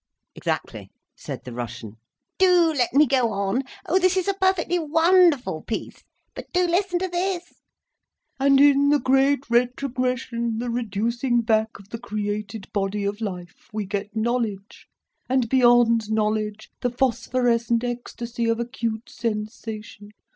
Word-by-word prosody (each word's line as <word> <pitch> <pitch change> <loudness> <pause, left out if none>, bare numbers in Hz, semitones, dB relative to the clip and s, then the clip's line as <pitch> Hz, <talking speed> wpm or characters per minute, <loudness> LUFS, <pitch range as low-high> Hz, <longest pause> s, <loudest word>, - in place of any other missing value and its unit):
"Exactly!" - - -4 0.3
said - - -7
the 125 - -8
Russian. 115 -2 -7 0.4
"Do 355 -3 +5
let 245 -4 +1
me 290 +4 +5
go 255 -4 +2
on! 200 +5 0 0.2
Oh, 370 +4 +2
this 370 0 +2
is 370 - 0
a 395 - +2
perfectly 375 -2 +1
wonderful 325 - +3
piece! 225 - -6 0.3
But - - -10
do 360 0 +3
listen 355 +1 +1
to 375 +1 -1
this. 355 0 -3 0.8
'And 275 0 +4
in 285 0 +5
the 295 - +5
great 270 +1 +2
retrogression, 245 -1 -1
the 240 +1 -3
reducing 235 +2 0
back 220 -1 +1
of 200 0 -17
the 230 - -6
created 210 -2 -4
body 200 0 -1
of 205 +2 -3
life, 180 -5 -7
we 215 -1 -3
get 200 +2 -4
knowledge, 220 -3 -2 0.4
and 255 -2 +2
beyond 240 -3 +4
knowledge, 215 0 -1
the 245 - +1
phosphorescent 240 -2 +1
ecstasy 240 -1 -3
of 230 0 +1
acute 235 -2 -3
sensation. 210 -1 -5
235 Hz, 140 wpm, -24 LUFS, 215-275 Hz, 0.8 s, Do